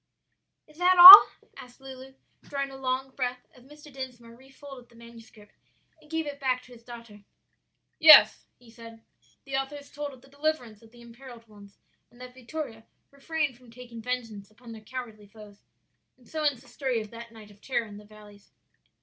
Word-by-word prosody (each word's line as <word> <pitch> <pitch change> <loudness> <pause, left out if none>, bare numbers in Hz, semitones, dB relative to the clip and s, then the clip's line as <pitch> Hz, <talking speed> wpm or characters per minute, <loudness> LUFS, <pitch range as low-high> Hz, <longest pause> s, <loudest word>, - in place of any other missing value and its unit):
'" - - -57
"Is 305 +1 -22
that 365 +1 +2
all?" 370 +3 +12 0.3
asked 245 +1 -15
Lulu, 265 0 -14 0.3
drawing 275 -1 -7
a - - -12
long 265 0 -5
breath, 250 -1 -6
as 250 - -22
Mr. 295 +1 -18
Dinsmore 245 -3 -11
refolded 265 -1 -16
the 235 - -24
manuscript 230 -2 -18 0.5
and 300 - -23
gave 320 0 -4
it 285 -1 -9
back 255 -2 -3
to 250 - -18
his 235 - -18
daughter. 230 -4 -15 0.8
"Yes," 315 -1 +6
he 240 -2 -21
said, 230 -1 -16 0.4
"the 275 -1 -7
author 270 +2 -5
has 285 -1 -14
told 290 -1 -8
of 260 -2 -19
the - - -20
deliverance 280 -6 -5
of 225 - -20
the 240 +1 -20
imperilled 235 0 -16
ones, 205 -2 -19 0.3
and 240 - -24
that 250 0 -13
Vittoria 255 -3 -10 0.2
refrained 295 -1 -5
from 250 -1 -22
taking 235 -1 -13
vengeance 225 -5 -7
upon 230 +2 -17
their 220 -1 -12
cowardly 220 -3 -11
foes; 205 -1 -18 0.6
and 250 - -26
so 315 - -7
ends 285 -5 -2
the - - -23
story 260 -4 -4
of 215 -1 -11
that 235 0 -13
night 215 -2 -16
of 200 0 -23
terror 240 -3 -4
in 205 -2 -14
the 210 - -15
valleys." 205 -1 -19
250 Hz, 190 wpm, -25 LUFS, 230-270 Hz, 0.8 s, all